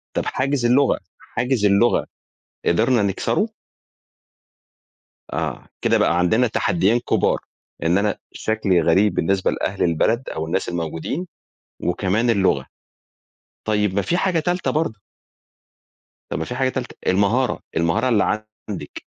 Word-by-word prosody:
طَب - - 0
حاجز 135 -1 0
اللغة 130 +3 +4 0.2
حاجز 125 -4 -1
اللغة، 100 +4 +3 0.6
قدرنا 115 +6 +3
نكسره؟ 100 - 0 1.9
آه. - - -3
كده - - +3
بقى 85 - +2
عندنا 110 +8 +3
تحدّيين 110 +1 +2
كُبار، - - +1 0.4
إن 85 +3 +3
أنا 105 +1 0
شكلي 100 -6 +1
غريب 90 +5 +3
بالنسبة 95 +3 +1
لأهل 95 - -2
البلد 110 +9 +1
أو 80 - -3
الناس 90 +4 -1
الموجودين 85 - -3 0.6
وكمان 100 +6 +1
اللغة، 95 -11 +2 1.0
طيب 105 -2 +1
ما 100 - +2
في 175 - 0
حاجة 180 -3 +1
تالتة 175 +3 0
برضه. 150 -9 -1 1.3
طَب - - -2
ما 80 - -2
في 125 - -5
حاجة 130 0 +1
تالتة، 130 -1 -5
المهارة، 105 +7 +2 0.2
المهارة 85 +10 +2
اللي 110 -1 +2 0.3
عندِك، 85 -8 -6
105 Hz, 125 wpm, -22 LUFS, 90-125 Hz, 1.9 s, اللغة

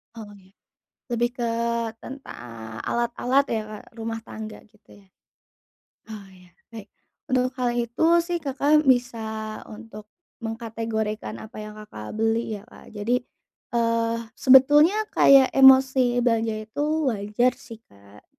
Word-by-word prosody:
Oh 220 -2 -9
ya, 190 0 -22 0.6
lebih 240 0 0
ke 235 - 0 0.6
tentang 115 - -9
alat-alat 245 +3 +1
ya 220 -2 -1
Kak, 215 +1 -12
rumah 225 0 -4
tangga 220 -1 -9
gitu 210 0 -23
ya? 195 - -25 1.0
Oh 210 -3 -9
ya 180 -1 -18 0.2
baik, 220 -3 -10 0.4
untuk 255 -2 +1
hal 240 -1 0
itu 240 +5 -1 0.2
sih 345 0 -3
Kakak 290 0 +1
bisa 220 -4 0
untuk 215 -1 -11 0.3
mengkategorikan 225 - -4
apa 220 0 -10
yang 215 0 -8
Kakak 155 - -9
beli 225 0 0
ya 200 - -10
Kak 235 - -17
jadi, 230 +4 0 0.6
eee, 230 0 +1
sebetulnya 295 +10 +5
kayak 270 -1 +6
emosi 260 -2 +5
belanja 225 -2 +1
itu 215 +6 -4 0.3
wajar 210 +4 0
sih 230 -4 -12
Kak, 100 +1 -20
230 Hz, 125 wpm, -24 LUFS, 215-250 Hz, 1.0 s, kayak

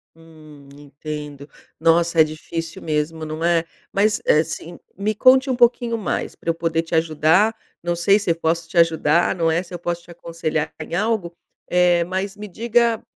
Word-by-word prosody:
Hum, 155 -3 -16
entendo. 145 0 -8 0.3
Nossa, 165 0 +3
é - - +9
difícil 165 +3 -6
mesmo, 155 +1 -2
não 155 +1 -5
é. 170 -1 +2 0.3
Mas, 210 +2 +2
eh, 155 +1 +4
sim 165 +2 -8 0.2
me 210 +2 -1
conte 260 +5 +5
um 255 - +1
pouquinho 240 -1 +2
mais, 210 - -3
pra - - -6
eu 165 - +1
poder 165 -1 0
te 165 0 -4
ajudar. 160 +7 +3 0.3
Não 175 0 -1
sei 195 +4 +4
se 205 -5 -1
eu - - +1
posso 165 0 -1
te 170 - -7
ajudar, 165 0 +3
não 165 -2 +1
é, 170 +2 +1
se 180 -1 -13
eu 175 - -5
posso 175 0 -3
te 170 - -15
aconselhar 165 -2 -3
em 160 +2 -5
algo, 200 -4 -1 0.3
eh, 175 -1 +3
mas 190 +2 -3
me 210 0 -8
diga 230 +3 +1
170 Hz, 185 wpm, -21 LUFS, 160-195 Hz, 0.3 s, é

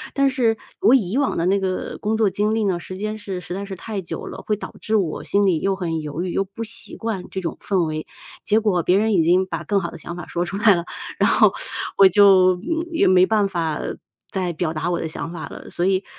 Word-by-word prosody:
但 275 0 +3
是 240 -4 +2 0.2
我 250 - +6
以 220 0 +1
往 285 - 0
的 165 - 0
那 195 +2 +3
个 185 -1 -3
工 215 +1 0
作 220 -2 +3
经 210 +3 0
历 225 - +1
呢， 185 -3 0
时 185 +2 -8
间 215 +2 -3
是 195 -3 -5
实 180 - -7
在 195 - -4
是 195 -1 -6
太 205 +2 -5
久 170 - -6
了， - - -7
会 210 - +2
导 - - -8
致 220 - 0
我 185 -7 0
心 200 0 +2
里 175 -5 +2
又 195 0 0
很 165 -4 -2
犹 150 +3 -4
豫， 185 - -3
又 195 - +1
不 200 +4 -7
习 225 - -7
惯 220 -5 -3
这 190 - -4
种 170 - -3
氛 190 -4 +1
围。 155 0 -4 0.4
结 215 0 +3
果 200 -5 +1
别 180 +3 +3
人 220 +1 +2
已 175 - +4
经 180 +3 +3
把 - - -5
更 200 -1 +1
好 170 -3 -4
的 - - -10
想 170 - -7
法 175 - -7
说 175 - -2
出 195 +3 -4
来 210 -1 +6
了， 170 -2 -1 0.4
然 - - +4
后 - - +5 0.4
我 195 - +9
就， 185 -1 +6
嗯， 325 - -3
也 330 - +2
没 185 0 +6
办 210 -1 +2
法 165 -5 -2 0.5
再 185 -2 -1
表 160 0 -2
达 165 +2 -2
我 175 - 0
的 - - -3
想 165 +1 -5
法 175 - -6
了。 - - -10
所 175 - -2
以， 190 0 +2
190 Hz, 280 characters per minute, -22 LUFS, 175-210 Hz, 0.5 s, 我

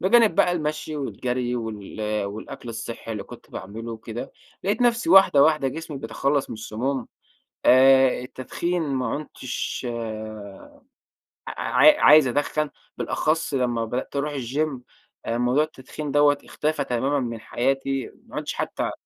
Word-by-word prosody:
بجانب 215 +1 +5
بقى 175 - +4
المشي 155 -2 -3
والجري 125 -3 -2
وال 110 -3 -6 0.2
والأكل 105 +4 -7
الصحّي 115 0 -6
اللي 105 - -4
كنت - - -13
باعمله 110 +5 -7
وكده، 115 +1 -7 0.3
لقيت 205 +5 0
نفْسي 235 -7 +2
واحدة 190 -7 +7
واحدة 155 -3 +3
جسمي 160 0 -6
بيتخلّص 135 +4 -1
من - - -4
السموم، 120 +4 -3 0.6
آآ 130 0 +6
التدخين 170 +8 -3
ما 130 -4 -1
عُنتش 130 -1 -4
آآ 110 -3 -7 0.7
ع - - -3 0.3
عا - - +9
عايز 150 -2 +8
أدخّن، 145 +3 0 0.3
بالأخص 160 0 0
لمّا 120 -3 0
بدأت 125 +5 -4
أروح 145 +1 -1
الgym، 135 +2 -2 0.5
موضوع 125 +5 +2
التدخين 150 -1 -7
دوّة 145 0 +4
اختفى 155 +1 -1
تمامًا 135 +4 0
من 115 -3 -3
حياتي، 135 +3 -1 0.2
ما - - -12
عُدتش - - -3
حتّى - - -2
130 Hz, 135 wpm, -24 LUFS, 115-150 Hz, 0.7 s, عا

